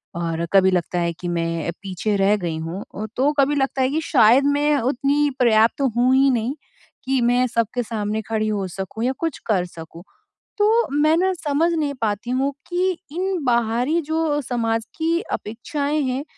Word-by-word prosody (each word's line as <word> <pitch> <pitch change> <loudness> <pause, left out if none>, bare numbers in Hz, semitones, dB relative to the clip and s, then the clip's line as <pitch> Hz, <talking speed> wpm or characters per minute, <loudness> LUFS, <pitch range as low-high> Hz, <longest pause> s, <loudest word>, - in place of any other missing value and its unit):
और 170 -1 -2
कभी 190 -1 +5
लगता 180 0 -1
है 170 -1 0
कि 175 +2 -7
मैं 165 -1 -2
पीछे 200 +2 -2
रह 195 +2 +3
गई 170 -5 -3
हूँ 165 +4 -5
अ, 215 - -4
तो 275 +3 +2
कभी 280 +1 +3
लगता 270 -1 0
है 260 - +2
कि 315 +2 0
शायद 255 -3 +5
मैं 295 +1 +2
उतनी 280 +4 +1
पर्याप्त 230 +1 +3 0.2
हूँ 250 +2 +4
ही 270 +1 +5
नहीं 245 +2 -1 0.5
कि 265 -1 +1
मैं 245 +1 +3
सबके 230 +1 -1
सामने 215 -1 -3
खड़ी 215 -1 0
हो 200 -3 -1
सकूँ 195 +5 -6
या 255 - +2
कुछ 330 -4 -2
कर 190 -6 +1
सकूँ। 165 0 -11 0.5
तो 415 0 +3 0.3
मैं 310 +1 +4
ना 375 +2 +2
समझ 325 0 0
नहीं 300 -3 -1
पाती 215 +1 -2
हूँ 270 +2 +1 0.2
कि 365 +1 +1 0.2
इन 365 0 -2
बाहरी 240 +5 +1
जो 315 -1 -1
समाज 230 -3 -1
की 330 +1 +1
अपेक्षाएँ 280 +7 -3
हैं 260 +1 -2
245 Hz, 180 wpm, -22 LUFS, 205-290 Hz, 0.5 s, कभी